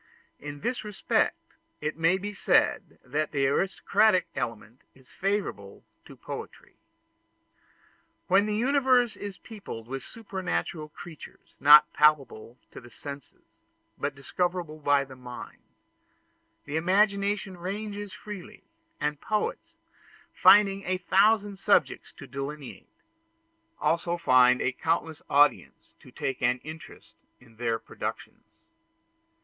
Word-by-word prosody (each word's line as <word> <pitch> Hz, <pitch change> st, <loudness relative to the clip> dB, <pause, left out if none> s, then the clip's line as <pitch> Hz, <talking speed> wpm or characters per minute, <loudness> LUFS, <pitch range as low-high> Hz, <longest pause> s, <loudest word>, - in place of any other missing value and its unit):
In 145 Hz, 0 st, -8 dB
this 245 Hz, -1 st, -2 dB
respect 210 Hz, -2 st, 0 dB, 0.4 s
it 150 Hz, +1 st, -3 dB
may 165 Hz, +3 st, +2 dB
be 205 Hz, +2 st, -5 dB
said -, -, +1 dB
that 150 Hz, +4 st, -2 dB
the 140 Hz, -1 st, +1 dB
aristocratic 195 Hz, +6 st, +2 dB
element 115 Hz, +1 st, -5 dB
is 130 Hz, -1 st, -21 dB
favorable 190 Hz, -, -3 dB, 0.2 s
to -, -, -13 dB
poetry. -, -, -9 dB, 1.5 s
When 195 Hz, +3 st, +3 dB
the 210 Hz, -, -1 dB
universe 250 Hz, -1 st, +3 dB
is 200 Hz, -2 st, -7 dB
peopled 195 Hz, -, -9 dB
with 135 Hz, +1 st, -5 dB
supernatural 185 Hz, -, -4 dB
creatures, 160 Hz, +1 st, -13 dB
not 150 Hz, +1 st, +8 dB
palpable 135 Hz, -6 st, +2 dB
to -, -, -10 dB
the 120 Hz, -, -14 dB
senses 140 Hz, +1 st, -11 dB, 0.3 s
but 145 Hz, -1 st, -3 dB
discovered 175 Hz, +5 st, -2 dB
by 145 Hz, -3 st, +1 dB
the 135 Hz, -1 st, -12 dB
mind, 125 Hz, -1 st, -10 dB, 1.0 s
the 145 Hz, -, -3 dB
imagination 200 Hz, +2 st, +1 dB
ranges 205 Hz, +3 st, -5 dB
freely, 205 Hz, -2 st, -10 dB, 0.4 s
and 150 Hz, 0 st, -2 dB
poets, 215 Hz, -1 st, -3 dB, 0.6 s
finding 200 Hz, -1 st, +5 dB
a 185 Hz, +1 st, -1 dB
thousand 200 Hz, +2 st, +2 dB
subjects -, -, +1 dB
to -, -, -11 dB
delineate, 140 Hz, +1 st, -7 dB, 0.9 s
also 170 Hz, +1 st, 0 dB
find 125 Hz, -6 st, +4 dB
a 125 Hz, -, +1 dB
countless 160 Hz, +3 st, -2 dB
audience 145 Hz, +1 st, +2 dB
to -, -, -16 dB
take 135 Hz, -2 st, -4 dB
an 125 Hz, 0 st, +2 dB
interest 155 Hz, +1 st, -11 dB, 0.2 s
in 115 Hz, -3 st, -21 dB
their 115 Hz, -1 st, 0 dB
productions. 330 Hz, -, -8 dB
165 Hz, 115 wpm, -27 LUFS, 140-200 Hz, 1.5 s, not